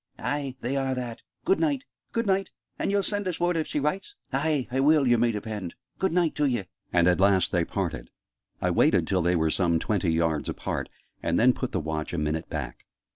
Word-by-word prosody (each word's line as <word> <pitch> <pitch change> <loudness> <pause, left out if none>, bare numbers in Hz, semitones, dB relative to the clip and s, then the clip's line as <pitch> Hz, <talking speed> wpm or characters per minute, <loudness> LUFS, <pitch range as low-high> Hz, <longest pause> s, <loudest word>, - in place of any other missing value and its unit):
"Ay, 140 -3 -2
they 125 +3 -1
are 135 -1 0
that! 120 -2 -5 0.2
Good 380 +2 +3
night!" 285 -4 0 0.3
"Good 230 0 0
night! 195 -1 +1 0.3
And - - 0
ye'll 200 0 +2
send 205 -1 -2
us 180 - -2
word 175 0 +2
if 160 -1 0
she - - -1
writes?" 185 - -2 0.2
"Aye, 145 -1 +1
ah 135 - +3
will, 150 0 +5
yer 120 -1 +4
may 120 0 +3
depend! 105 -4 -5 0.2
Good 190 - +1
night 170 -2 +2
t'ye!" 130 -8 +1 0.3
And 85 0 +4
at 90 0 +3
last 95 -1 +4
they 85 -2 +2
parted. - - -3 0.5
I - - +1
waited - - +4
till 95 -2 +1
they 90 +1 +2
were 80 -1 +2
some 85 -2 +2
twenty 95 +1 0
yards 80 -2 +1
apart, - - -3 0.3
and 85 +1 +1
then 125 +2 +6
put 130 0 -4
the 95 - 0
Watch 80 0 -3
a - - -1
minute 75 +1 -2
back. - - -5
125 Hz, 215 wpm, -27 LUFS, -, 0.5 s, then